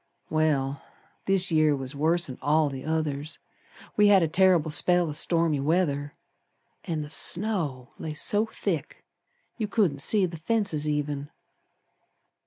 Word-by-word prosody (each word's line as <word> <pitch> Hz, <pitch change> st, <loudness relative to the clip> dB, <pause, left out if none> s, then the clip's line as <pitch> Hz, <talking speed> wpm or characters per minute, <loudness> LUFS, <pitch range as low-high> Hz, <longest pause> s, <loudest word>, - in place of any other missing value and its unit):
Well, 145 Hz, -3 st, 0 dB, 0.5 s
this 190 Hz, -2 st, +2 dB
year 155 Hz, -2 st, +3 dB
was 135 Hz, 0 st, -6 dB
worse'n 155 Hz, -2 st, -1 dB
all 150 Hz, +2 st, +2 dB
the 135 Hz, -1 st, -7 dB
others; 155 Hz, -1 st, -2 dB, 0.6 s
We 210 Hz, -1 st, +5 dB
had 195 Hz, -3 st, +6 dB
a -, -, +2 dB
terrible 175 Hz, -2 st, +3 dB
spell 175 Hz, +2 st, +3 dB
o' -, -, -3 dB
stormy 165 Hz, 0 st, +1 dB
weather, 145 Hz, -2 st, 0 dB, 0.7 s
An' 160 Hz, -3 st, -3 dB
the 150 Hz, -, -10 dB
snow 165 Hz, -, -1 dB
lay 155 Hz, -1 st, -5 dB
so 210 Hz, +7 st, +1 dB
thick 165 Hz, -9 st, -4 dB, 0.5 s
You 215 Hz, -, -1 dB
couldn't 195 Hz, -10 st, +1 dB
see 205 Hz, +5 st, +4 dB
the 170 Hz, -2 st, -6 dB
fences 165 Hz, -5 st, -1 dB
even. 145 Hz, -1 st, -2 dB
155 Hz, 135 wpm, -26 LUFS, 145-180 Hz, 0.7 s, had